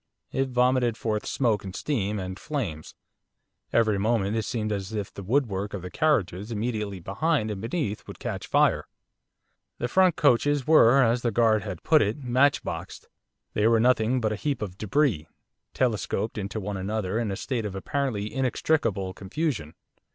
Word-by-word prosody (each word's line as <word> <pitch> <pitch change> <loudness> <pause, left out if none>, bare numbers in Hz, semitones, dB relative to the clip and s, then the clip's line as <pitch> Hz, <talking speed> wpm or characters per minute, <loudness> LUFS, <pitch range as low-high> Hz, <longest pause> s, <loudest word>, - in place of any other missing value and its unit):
It 135 0 0
vomited 125 -2 +2
forth 105 -2 -2
smoke, 115 -6 +1
and 95 -1 -7
steam, 105 -8 -1
and 95 0 -5
flames, 110 - -4 0.8
every 110 -3 +3
moment 105 -1 +1
it 110 -2 -1
seemed 110 -2 -2
as 100 0 -3
if 105 -3 -4
the - - -8
woodwork 105 -3 0
of 95 - -6
the 90 - -7
carriages 105 - 0
immediately 105 -3 -2
behind 110 - 0
and 100 -2 -5
beneath 115 - -3
would - - -9
catch - - -5
fire. - - +2 0.9
The 120 - -2
front 185 +5 +4
coaches 145 0 +3
were, 135 -4 +6
as 120 +1 +2
the 120 - +1
guard 110 -1 +3
had 95 -5 -6
put 155 -2 +5
it, 105 +5 0
'matchboxed.' 130 +3 0 0.4
They 105 +1 +2
were 115 0 +4
nothing 125 +1 +3
but 110 -3 0
a - - -4
heap 140 -2 -2
of 90 -3 -6
débris, 110 - +1 0.5
telescoped 110 -3 0
into 105 +1 -4
one 100 0 -4
another 100 +1 -2
in 115 -3 -1
a 95 - -2
state 115 0 -2
of 95 - -7
apparently 110 -1 -2
inextricable 115 -7 0
confusion. 105 - -3
110 Hz, 165 wpm, -26 LUFS, 100-130 Hz, 0.9 s, were